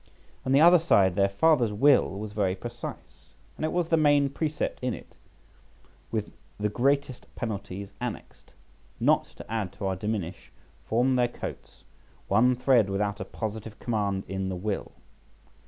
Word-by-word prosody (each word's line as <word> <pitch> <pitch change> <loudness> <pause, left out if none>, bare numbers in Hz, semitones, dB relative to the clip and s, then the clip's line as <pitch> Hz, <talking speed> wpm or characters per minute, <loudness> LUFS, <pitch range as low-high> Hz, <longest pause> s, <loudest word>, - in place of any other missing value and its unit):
On - - +1
the 140 +2 +6
other 175 +2 +8
side, 95 - +3
their 100 0 +3
father's 120 +2 +3
will 140 +8 +4
was 105 0 -6
very 100 -3 0
precise, 120 +4 -9 0.2
and - - -7
it 155 - 0
was 175 -2 0
the 165 - +4
main 145 -2 +4
precept 155 +1 -2
in 125 -2 -1
it, - - -14 1.0
with - - -2 0.3
the 105 0 0
greatest 135 +3 0
penalties 100 -4 -5
annexed, - - -7 0.5
not - - +3
to - - -9
add 110 -5 -3
to 100 - -6
or 95 -1 0
diminish 95 -4 -4 0.4
from 125 +3 +2
their 120 -1 +3
coats 120 - -8 0.4
one 125 +5 +4
thread 120 -5 +3
without 100 +1 -1
a 95 - -4
positive 110 +1 -6
command 100 -4 -1
in 95 0 -3
the 95 - -3
will. 100 +2 -3
110 Hz, 155 wpm, -27 LUFS, 100-135 Hz, 1.0 s, other